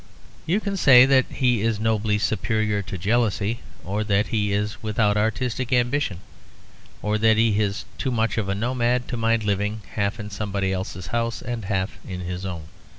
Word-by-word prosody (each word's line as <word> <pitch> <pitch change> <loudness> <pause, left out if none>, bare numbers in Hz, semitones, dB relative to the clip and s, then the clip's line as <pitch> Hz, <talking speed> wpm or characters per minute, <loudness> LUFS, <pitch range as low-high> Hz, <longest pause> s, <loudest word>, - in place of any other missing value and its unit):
You 180 +6 +2
can 200 -2 -3
say 130 -7 +8
that 130 -1 +4
he 125 -5 +1
is 110 -1 0
nobly 110 -1 +1
superior 110 0 0
to 95 -1 -6
jealousy, 110 +2 0 0.3
or 100 +4 -1
that 105 0 +1
he 105 -2 0
is 105 +1 -2
without 105 -1 +1
artistic 120 +3 -1
ambition, 125 -6 +1 0.8
or 105 0 0
that 110 0 +4
he 110 -2 +3
is 100 -1 -1
too 135 - -1
much 115 -3 0
of 100 -2 -2
a 100 - 0
nomad 120 +2 0
to 125 - -2
mind 115 -1 +1
living 105 +1 -1
half 105 +2 -1
in 105 -1 -6
somebody 100 -2 -2
else's 95 -1 -5
house 115 -1 -1
and 120 -3 -4
half 95 0 -2
in 90 -2 -6
his 90 +1 -4
own. 85 -4 -5
110 Hz, 180 wpm, -24 LUFS, 100-120 Hz, 0.8 s, say